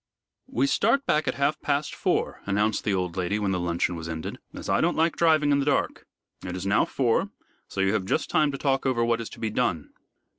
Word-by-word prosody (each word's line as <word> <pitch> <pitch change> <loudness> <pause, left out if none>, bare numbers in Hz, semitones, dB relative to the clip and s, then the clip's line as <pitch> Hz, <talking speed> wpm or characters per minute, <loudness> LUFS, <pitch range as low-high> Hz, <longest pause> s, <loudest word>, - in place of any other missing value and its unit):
"We 130 +4 +1
start 230 - +2
back 150 0 +1
at - - 0
half 145 +2 0
past 145 0 -1
four," - - -1
announced 105 +2 +1
the 105 - 0
old 90 -2 -2
lady, 95 +2 -1
when 100 -2 -1
the 90 - 0
luncheon 85 0 -1
was 80 0 -6
ended, 80 -1 -5
"as - - -8
I - - +2
don't 170 +2 +1
like 165 +1 +2
driving 155 -3 +3
in 140 - +3
the - - +1
dark. 145 - 0 0.4
It 90 -1 -5
is 95 +1 -5
now 100 +2 +3
four, 120 -4 +1 0.4
so 95 - -3
you 95 +1 +2
have 105 -4 0
just 155 - 0
time 150 -2 +2
to 135 - -5
talk 135 -1 0
over 120 -3 +1
what 115 0 +1
is 115 - -6
to - - -12
be 110 -1 -2
done." 90 -10 -1
115 Hz, 235 wpm, -26 LUFS, 95-145 Hz, 0.4 s, driving